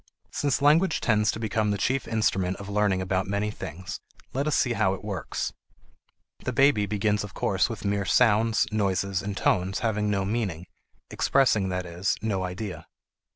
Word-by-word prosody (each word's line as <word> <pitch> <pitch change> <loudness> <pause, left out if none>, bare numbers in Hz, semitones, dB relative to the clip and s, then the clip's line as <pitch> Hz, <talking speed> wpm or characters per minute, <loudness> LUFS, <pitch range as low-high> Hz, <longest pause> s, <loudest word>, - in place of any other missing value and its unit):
Since 140 -1 0
language 160 +6 +4
tends 105 -2 +2
to - - -1
become 110 -1 0
the 100 - 0
chief 130 +6 0
instrument 95 -4 0
of 100 - -9
learning 100 -2 +1
about 95 0 -1
many 100 +2 -1
things, 90 -1 -7 0.3
let 140 +3 -1
us 150 - +2
see 125 - +2
how 95 -4 +1
it 95 - -12
works. 100 -4 -3 0.9
The - - -3
baby 130 -6 +3
begins 105 0 0
of 105 - -9
course 95 +3 +1
with 115 -2 -6
mere 100 0 0
sounds, 110 +3 +3
noises, 100 -2 0
and 100 -1 -4
tones 95 +2 +1
having 105 -2 0
no 100 -2 0
meaning, 95 -6 -2 0.5
expressing, 110 -8 +2
that 90 0 -2
is, 90 +3 -1
no 100 -4 -1
idea. 90 +2 -5
105 Hz, 170 wpm, -26 LUFS, 95-110 Hz, 0.9 s, language